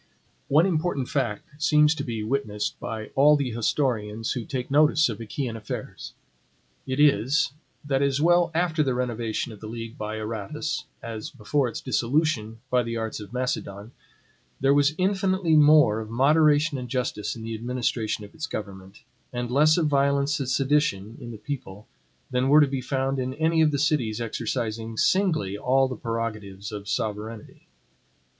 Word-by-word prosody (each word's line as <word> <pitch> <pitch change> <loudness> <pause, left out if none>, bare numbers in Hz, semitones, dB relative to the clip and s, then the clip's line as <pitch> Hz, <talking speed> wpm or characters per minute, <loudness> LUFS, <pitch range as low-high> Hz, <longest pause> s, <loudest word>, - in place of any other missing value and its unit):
One 155 +5 +4
important 160 -7 -1
fact 140 +4 -3
seems 150 0 +5
to 160 - -4
be 115 -3 -4
witnessed 110 -3 -2
by 110 -1 -5
all 150 +2 +6
the 140 -4 -1
historians 115 -2 -1
who 120 -4 -3
take 130 -1 -4
notice 150 0 +4
of 115 -1 -5
Achaean 115 +2 -4
affairs. 110 -2 -7 0.7
It 130 +2 -2
is, 145 - +3 0.3
that 135 -1 +1
as 140 -1 +1
well 175 +2 +4
after 170 -2 +1
the 130 -4 +1
renovation 120 -2 -2
of 105 - -11
the 110 - -8
league 115 +1 -7
by 110 0 -3
Aratus, 115 +8 -4 0.2
as 110 -2 -5
before 135 +3 -1
its 115 - -5
dissolution 120 -4 0
by 125 0 +4
the 115 -1 -3
arts 110 -1 -3
of 105 0 -10
Macedon, 115 -4 -3 0.7
there 135 +1 +4
was 145 +1 +3
infinitely 190 -3 +1
more 150 -7 +6
of 110 -1 -6
moderation 150 +3 +3
and 125 -1 -7
justice 125 -4 -2
in 115 - -8
the 115 0 -4
administration 115 -2 -2
of 100 - -16
its 165 0 -5
government, 95 -1 -8 0.3
and 120 -1 -4
less 155 +5 +4
of 170 - +2
violence 140 0 +2
and 135 -2 -2
sedition 130 -7 +1
in 120 - -7
the 115 - -7
people, 105 -5 -7 0.4
than 125 +1 +1
were 150 +2 +7
to - - +6
be 135 -1 -3
found 135 +1 -1
in 130 +1 -3
any 160 +1 +2
of 155 - +5
the 145 - -1
cities 135 -7 0
exercising 115 -1 -3
SINGLY 155 - +1
all 135 +3 +3
the 130 - -5
prerogatives 110 -3 -4
of 105 -1 -7
sovereignty. 110 0 -4
125 Hz, 165 wpm, -25 LUFS, 110-150 Hz, 0.7 s, were